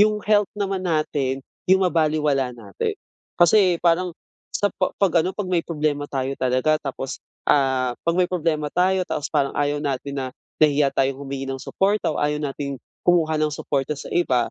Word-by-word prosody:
yung 210 0 +4
health 210 -1 +3
naman 195 -2 -1
natin 145 -6 -1 0.2
yung 190 0 +5
mabalewala 150 -5 +2
natin. 100 -5 -4 0.4
Kasi 180 +1 +5
parang, 175 +1 +3 0.4
sa 205 -2 0
pa 185 - 0
'pag 175 -4 +3
ano, 185 - -1
'pag 205 -3 -2
may 175 -2 +1
problema 150 -3 -1
tayo 135 0 -2
talaga 130 +4 +2
tapos, 135 -1 -5 0.3
ah, 130 -3 +3
'pag 170 0 +1
may 180 -1 +4
problema 160 -4 0
tayo 185 +1 +2
tapos 150 - -2
parang 140 -3 +1
ayaw 145 0 +1
natin 140 -1 -3
na 135 -1 -2 0.3
nahihiya 145 -2 +4
tayong 135 0 0
humingi 135 -1 -5
ng 135 0 -4
suporta 200 0 +1
o - - -3
ayaw 150 0 0
nating 140 -2 -4 0.3
kumuha 160 -3 +3
ng 155 - +2
suporta 140 0 -1
sa 140 - -9
iba, 130 -9 +2
150 Hz, 175 wpm, -23 LUFS, 135-175 Hz, 0.4 s, yung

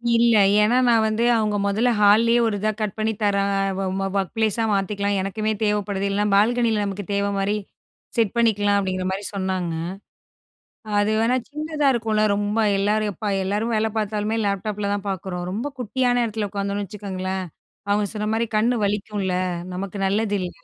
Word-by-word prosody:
இல்ல. 235 0 +4 0.3
ஏன்னா, 225 +4 +3
நான் 230 -2 +4
வந்து 215 +2 0
அவங்க 215 -2 +1
முதல்ல 220 +5 +2
ஹால்லயே 225 +3 +5
ஒரு 215 - -1
இதா 215 +2 +1
கட் 210 -3 -2
பண்ணி 220 +1 0
தரேன், 200 -1 +2 0.3
ஒ - - -1 0.3
ஒர்க் 195 -2 -2
ப்ளேஸா 225 0 +1
மாத்திக்கலாம். 200 +1 0
எனக்குமே 215 +3 -2
தேவைப்படுது. 205 -2 0
இல்லைன்னா, 205 +1 +1
பால்கனியில 225 0 +2
நமக்கு 200 0 -4
தேவை 200 0 +1
மாரி 195 +1 0 0.6
செட் 225 -4 +2
பண்ணிக்கலாம். 205 -3 +3
அப்டிங்கிற 185 -1 -2
மாரி 195 +2 -3
சொன்னாங்க. 185 -3 -2 1.3
அது 205 +1 +2
வேணா, 240 +3 +2
சின்னதா 300 -1 -1
இருக்கும்ல, 220 -2 +1
ரொம்ப. 205 +2 -1 0.2
எல்லாரும் 210 +1 +1
எப்ப, 205 +3 -3
எல்லாரும் 210 +4 -1
வேலை 220 +1 +1
பார்த்தாலுமே, 215 +1 -1
லேப்டாப்பில 200 +1 -2
தான் 205 0 -5
பார்க்குறோம். 180 -1 -4
ரொம்ப 230 +7 -3
குட்டியான 245 +1 +1
இடத்துல 215 -2 -3
உட்காந்தோம்னு 200 0 -2
வச்சுக்கோங்களேன். 190 -1 -4 0.5
அவுங்க 205 0 +2
சொன்ன 210 0 -2
மாரி, 230 +1 0
கண் 230 +3 +3
வலிக்கும்ல. 200 -2 -2 0.4
நமக்கு 195 +2 -5
நல்லது 205 +1 0
இல்ல. 180 - -3
210 Hz, 155 wpm, -23 LUFS, 200-220 Hz, 1.3 s, ஹால்லயே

